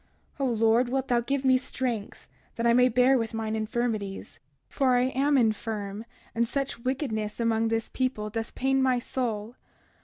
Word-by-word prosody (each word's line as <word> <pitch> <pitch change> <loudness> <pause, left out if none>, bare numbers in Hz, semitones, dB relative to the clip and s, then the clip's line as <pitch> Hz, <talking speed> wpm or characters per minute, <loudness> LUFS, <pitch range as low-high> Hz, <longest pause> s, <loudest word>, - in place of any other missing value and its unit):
O 275 - +1
Lord, 230 0 +3
wilt 265 +1 -1
thou 240 -1 +3
give 270 +3 -2
me 260 -1 +5
strength, 245 -5 -4 0.3
that 230 - -2
I 235 - +5
may 250 +1 +5
bear 250 +2 +4
with 225 -1 -3
mine 220 -1 -2
infirmities. 215 -3 -3 0.3
For 260 -3 +2
I 250 +1 +2
am 280 +2 +2
infirm, 215 -2 -1 0.3
and 235 0 +1
such 275 0 -3
wickedness 235 -5 -3
among 225 -1 +1
this 225 0 -1
people 235 -5 -2
doth 225 +1 -5
pain 270 +1 +1
my 260 -1 +3
soul. 235 -2 -3
235 Hz, 165 wpm, -27 LUFS, 220-260 Hz, 0.3 s, me